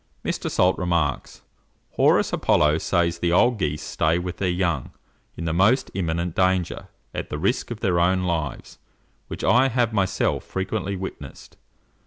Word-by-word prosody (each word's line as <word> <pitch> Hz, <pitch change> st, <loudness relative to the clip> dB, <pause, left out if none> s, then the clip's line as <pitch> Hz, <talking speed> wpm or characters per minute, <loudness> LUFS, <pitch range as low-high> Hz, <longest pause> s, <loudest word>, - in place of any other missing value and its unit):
Mr. -, -, -2 dB
Salt 90 Hz, +1 st, +2 dB
remarks, 85 Hz, -6 st, -1 dB, 0.5 s
"Horus -, -, +3 dB
Apollo 75 Hz, +1 st, +3 dB
says 85 Hz, -1 st, 0 dB
the 85 Hz, 0 st, 0 dB
old 115 Hz, +6 st, +3 dB
geese 75 Hz, -4 st, -2 dB
stay 80 Hz, +2 st, 0 dB
with 90 Hz, 0 st, -4 dB
their 95 Hz, -, 0 dB
young 90 Hz, -7 st, -1 dB, 0.5 s
in 85 Hz, -, -5 dB
the 80 Hz, -, -1 dB
most 110 Hz, +10 st, +3 dB
imminent 85 Hz, -2 st, -2 dB
danger, 95 Hz, -1 st, 0 dB, 0.3 s
at -, -, -5 dB
the 75 Hz, -, -4 dB
risk 95 Hz, -, -1 dB
of 120 Hz, -2 st, -6 dB
their 90 Hz, -5 st, +1 dB
own 90 Hz, +2 st, +2 dB
lives, 80 Hz, -5 st, -3 dB, 0.5 s
which -, -, -7 dB
I 130 Hz, +2 st, +4 dB
have 120 Hz, -3 st, 0 dB
myself 95 Hz, -3 st, 0 dB
frequently 95 Hz, +1 st, -3 dB
witnessed. 95 Hz, 0 st, -8 dB
90 Hz, 155 wpm, -23 LUFS, 85-95 Hz, 0.5 s, I